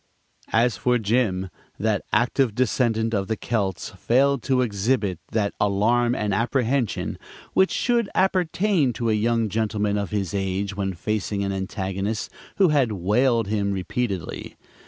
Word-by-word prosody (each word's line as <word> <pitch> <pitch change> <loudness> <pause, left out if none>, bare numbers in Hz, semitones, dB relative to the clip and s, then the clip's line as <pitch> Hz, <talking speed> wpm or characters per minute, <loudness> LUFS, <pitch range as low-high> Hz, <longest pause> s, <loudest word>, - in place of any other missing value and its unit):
As 115 -2 +2
for 125 +4 +2
Jim, 100 -5 0 0.3
that 105 -1 0
active 120 -1 +2
descendant 115 -2 +1
of 100 -2 0
the 110 0 -1
Celts 100 -6 -2
failed 135 +2 +2
to 130 +2 +1
exhibit 100 -3 0
that 105 -2 0
alarm 115 +5 +2
and 105 -4 -1
apprehension 120 +2 0 0.3
which 190 - +4
should 235 -4 +1
appertain 185 - +2
to 115 0 -1
a - - +3
young 115 +1 +1
gentleman 105 -1 0
of 100 - -3
his 100 -5 -2
age 95 +1 -2
when 95 -1 -2
facing 105 +1 -2
an 100 - -1
antagonist 95 +2 -3 0.2
who 190 -3 +4
had 140 -6 +2
"whaled" 115 +5 +2
him 100 -1 -1
repeatedly. 95 - -3
110 Hz, 140 wpm, -24 LUFS, 100-125 Hz, 0.3 s, which